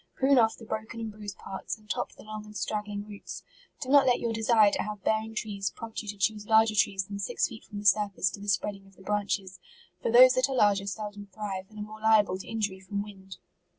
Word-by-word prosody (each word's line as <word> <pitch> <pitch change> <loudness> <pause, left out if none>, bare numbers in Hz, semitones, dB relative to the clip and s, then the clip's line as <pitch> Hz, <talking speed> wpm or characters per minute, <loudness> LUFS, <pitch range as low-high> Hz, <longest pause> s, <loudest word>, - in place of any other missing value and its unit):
Prune 270 0 +4
off 225 -1 +3
the 225 - -12
broken 220 +1 -5
and 225 -1 -4
bruised 205 -1 -8
parts, 195 +2 -6
and 215 -1 -22
top - - -2
the - - -15
long 215 0 -7
and 210 0 -13
strag 210 +1 -2
gling 205 0 -5
roots. 205 -1 -8 0.4
Do 260 - -4
not 280 -1 +6
let 245 - +4
your 235 -1 -1
desire 220 -2 +4
to - - -1
have 210 -2 -6
bearing 220 0 0
trees 200 -3 -2
prompt 230 -1 -7
you 215 - -12
to 205 0 -5
choose 205 +2 0
larger 220 0 +5
trees 195 -1 +2
than 200 +1 -6
six 220 +5 0
feet 225 -2 -11
from 210 - -9
the 205 - -6
surface 200 -1 +3
to - - -8
the 205 - -9
spreading 195 +1 -1
of 195 - -21
the 190 - -16
branches; 200 -2 -2 0.4
for - - 0
those 255 +2 +9
that 255 +1 +2
are 270 - -2
larger 200 -4 +3
seldom 205 0 -5
thrive, 195 -1 -5
and 215 - -15
are 210 - -4
more 215 +1 -10
liable 210 -4 +4
to - - -9
injury 205 -4 -2
from 200 +2 -4
wind. 195 -2 -11
210 Hz, 250 wpm, -28 LUFS, 200-220 Hz, 0.4 s, those